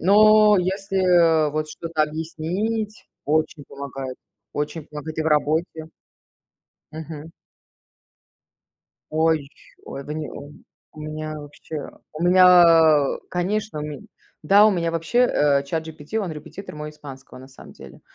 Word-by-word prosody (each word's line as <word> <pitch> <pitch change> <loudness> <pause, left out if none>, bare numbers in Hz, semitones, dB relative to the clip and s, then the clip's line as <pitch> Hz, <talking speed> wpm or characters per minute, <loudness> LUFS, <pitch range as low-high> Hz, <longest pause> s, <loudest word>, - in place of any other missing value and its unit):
Но 210 +2 +6
если 180 -4 +2
вот 155 +1 -3
что-то 165 0 -2
объяснить 175 +8 -3 0.2
очень 155 0 -1
помогает, 135 -2 -7 0.4
очень 150 +1 -4
помогает 155 +1 -8
и - - +1
в - - -4
работе. 155 +1 0 1.0
Мгм. 155 0 -8 1.8
Ой, 160 +1 +2
еще 140 +1 -18 0.3
ой, 135 - -8
вы 150 - -6
не 155 -1 -5
у 145 +1 -10 0.4
у 155 - -12
меня 155 0 -6
вообще. 150 +1 -8 0.2
У 155 - -5
меня, 170 -5 +6
конечно, 190 -1 -2
у - - -4
мень 150 -2 -8 0.3
да, 200 +7 +6
у - - +5
меня 170 -4 -1
вообще, 165 +9 -1
э, 145 - +3
Чат 160 +3 -3
GPT- 160 +7 -5
он 190 -4 -4
репетитор 155 +4 -9
мой 150 0 -6
испанского, 135 -4 -12
на 130 +1 -13
самом 135 - -14
деле. - - -14
155 Hz, 135 wpm, -22 LUFS, 150-180 Hz, 1.8 s, Но